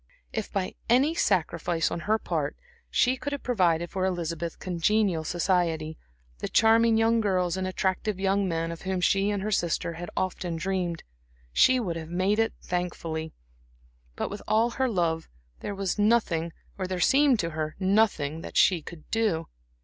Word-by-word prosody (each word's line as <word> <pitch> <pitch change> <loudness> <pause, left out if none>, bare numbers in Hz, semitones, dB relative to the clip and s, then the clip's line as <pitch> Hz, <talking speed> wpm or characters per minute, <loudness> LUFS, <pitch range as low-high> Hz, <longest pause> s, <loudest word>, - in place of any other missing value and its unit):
If 220 -2 -3
by 190 -2 -2 0.2
any 265 +7 +4
sacrifice 170 - 0
on - - -2
her 220 - +4
part 155 -8 -2 0.3
she 255 +1 +3
could 285 +3 -4
have 285 - -5
provided 175 -8 +1
for 190 - -2
Elizabeth 170 -2 -2
congenial 185 0 +1
society 165 -2 0 0.4
the - - -4
charming 225 0 +5
young 225 +1 +3
girls 185 -4 +1
and 190 0 -2
attractive 190 +2 -1
young 195 0 +1
men 165 -1 -1
of 170 - -8
whom 190 -1 -2
she 195 +2 +2
and 200 -2 -1
her 215 - -2
sister 170 -3 0
had 175 +1 -7
often 180 -2 -2
dreamed 175 -1 -2 0.5
she 255 - +5
would 175 -8 -2
have 160 -1 -7
made 185 +5 +1
it 225 0 +2
thankfully; 165 -3 -3 0.8
but - - -3
with 205 - -6
all 225 +2 +3
her 260 +1 0
love, 165 -5 -1 0.3
there 205 - -5
was 195 +1 -2
nothing 205 -7 +2 0.3
or 185 - -2
there 185 -1 -3
seemed 270 +6 +4
to 170 -1 -3
her 155 0 -3
nothing 185 -6 +1
that - - -6
she 180 -4 +5
could 155 0 -11
do. 215 -8 +1
185 Hz, 170 wpm, -27 LUFS, 170-215 Hz, 0.8 s, charming